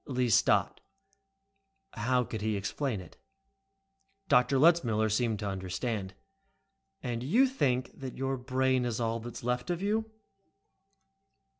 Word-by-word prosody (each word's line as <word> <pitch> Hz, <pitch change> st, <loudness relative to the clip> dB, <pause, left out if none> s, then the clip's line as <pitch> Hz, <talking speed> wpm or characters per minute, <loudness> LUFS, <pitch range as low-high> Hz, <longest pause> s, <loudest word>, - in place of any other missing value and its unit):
Lee 125 Hz, -3 st, 0 dB
stopped. -, -, +3 dB, 1.1 s
How 125 Hz, 0 st, +1 dB
could 110 Hz, -3 st, -6 dB
he 110 Hz, 0 st, 0 dB
explain 110 Hz, +2 st, -2 dB
it? 85 Hz, -, -15 dB, 1.1 s
But 125 Hz, +2 st, +4 dB
Letzmiller 130 Hz, -7 st, +4 dB
seemed 110 Hz, 0 st, +1 dB
to 105 Hz, 0 st, -4 dB
understand. 95 Hz, +2 st, -3 dB, 0.9 s
"And 120 Hz, -2 st, -3 dB
you 210 Hz, -, +4 dB
think 135 Hz, -, 0 dB
that 130 Hz, -2 st, -7 dB
your 135 Hz, 0 st, -1 dB
brain 130 Hz, 0 st, +1 dB
is 120 Hz, -2 st, -2 dB
all 115 Hz, 0 st, -1 dB
that 120 Hz, +1 st, -8 dB
is -, -, -8 dB
left 125 Hz, +4 st, -1 dB
of 175 Hz, -1 st, -1 dB
'you'?" 215 Hz, +3 st, -1 dB
125 Hz, 130 wpm, -30 LUFS, 110-135 Hz, 1.1 s, But